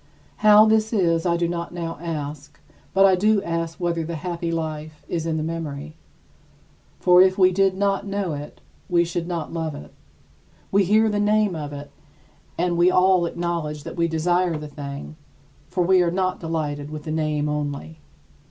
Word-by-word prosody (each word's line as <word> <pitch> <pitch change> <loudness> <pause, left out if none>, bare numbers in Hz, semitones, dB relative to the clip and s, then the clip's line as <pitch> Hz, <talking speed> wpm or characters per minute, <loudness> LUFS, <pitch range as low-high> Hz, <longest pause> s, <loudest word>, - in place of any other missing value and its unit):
How 215 0 +7
this 220 0 +2
is, 170 -4 +2
I 170 0 +2
do 170 0 0
not 170 0 -4
now 165 -2 -5
ask; 150 -3 -6 0.3
but 195 0 +5
I 190 - +6
do 210 +3 +3
ask 165 -1 -3
whether 170 -2 -1
the 165 +1 -5
happy 170 +1 -3
life 155 -2 -5
is 165 -1 -3
in 160 -1 -1
the 155 - -2
memory. 155 -2 -5 1.1
For 180 0 +6
if 185 0 +4
we 185 -1 +5
did 190 0 +2
not 200 0 0
know 195 -4 -2
it, 145 0 -8 0.3
we 170 -1 +3
should 170 0 -3
not 170 -3 -4
love 160 -2 -3
it. 75 0 -11 0.8
We 200 0 +3
hear 215 +4 +4
the 210 -1 0
name 210 -2 +2
of 150 -2 -5
it, 145 0 -8 0.7
and 175 0 0
we 175 +1 +6
all 185 -1 +4
acknowledge 165 -4 -3
that - - -7
we 170 -1 +1
desire 175 +1 +1
the 150 0 -7
thing, 145 +1 -8 0.5
for 180 - 0
we 185 +1 +4
are 175 - +2
not 185 +1 -1
delighted 150 -3 -3
with 155 -1 -7
the 155 - -5
name 155 -1 0
only. 150 +1 -4
170 Hz, 180 wpm, -23 LUFS, 155-185 Hz, 1.1 s, How